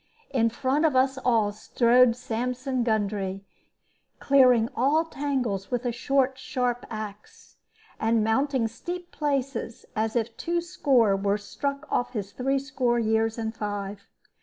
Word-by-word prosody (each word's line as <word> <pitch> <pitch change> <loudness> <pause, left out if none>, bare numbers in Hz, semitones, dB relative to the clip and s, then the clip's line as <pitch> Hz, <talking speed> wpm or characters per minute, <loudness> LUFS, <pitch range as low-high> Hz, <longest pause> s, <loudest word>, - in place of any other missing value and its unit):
In 230 -4 +2
front 265 +5 0
of 310 -4 +3
us 265 +1 +2
all 225 -5 +2
strode 235 +3 +3
Sampson 250 +2 -2
Gundry, 200 -3 -1 0.7
clearing 255 -5 +5
all 290 +7 +2
tangles 260 -11 -2
with 245 0 -2
a 245 - +1
short, 265 +2 0
sharp 250 -2 -2
axe, 210 -2 -9 0.4
and 225 0 +2
mounting 245 +2 +1
steep 345 +10 -7
places 275 -4 -2
as 220 +1 -1
if 230 -1 -1
twoscore 290 - +2
were 200 +1 0
struck 280 +7 -4
off 245 - 0
his 205 -4 -4
threescore 265 -2 0
years 225 0 +1
and 220 -1 -3
five. 205 -1 -5
245 Hz, 130 wpm, -26 LUFS, 220-270 Hz, 0.7 s, clearing